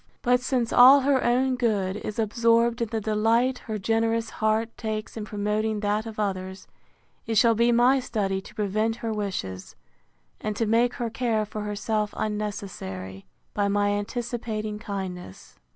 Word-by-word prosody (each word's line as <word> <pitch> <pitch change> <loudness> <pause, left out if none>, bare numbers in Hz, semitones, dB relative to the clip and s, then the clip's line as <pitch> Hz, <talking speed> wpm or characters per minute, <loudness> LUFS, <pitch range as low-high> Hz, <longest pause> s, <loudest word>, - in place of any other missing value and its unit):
But 250 0 +4
since 250 -2 -1
all 265 +3 +8
her 270 -1 +2
own 255 +2 +2
good 205 -6 0
is 210 0 -6
absorbed 230 +2 +2
in 230 - +1
the 225 - -2
delight 225 +4 +1
her 220 -1 -2
generous 225 +2 0
heart 220 +1 0
takes 215 -1 -4
in 220 -2 -5
promoting 210 +1 -1
that 210 +2 0
of 220 -1 -8
others, 190 -2 -3 0.6
it 225 - -1
shall 230 +2 +5
be 235 +2 +3
my 245 +3 +4
study 200 -6 -2
to 215 - -14
prevent 215 +1 0
her 225 - -1
wishes, 185 - -4 0.6
and 215 -1 -3
to 225 - 0
make 235 +3 +2
her 235 -2 -3
care 225 -3 0
for 215 +1 -6
herself 210 +1 -2
unnecessary, 190 - -5 0.3
by 205 -1 +1
my 205 0 +1
anticipating 215 0 -3
kindness. 190 - -7
215 Hz, 155 wpm, -26 LUFS, 205-235 Hz, 0.6 s, all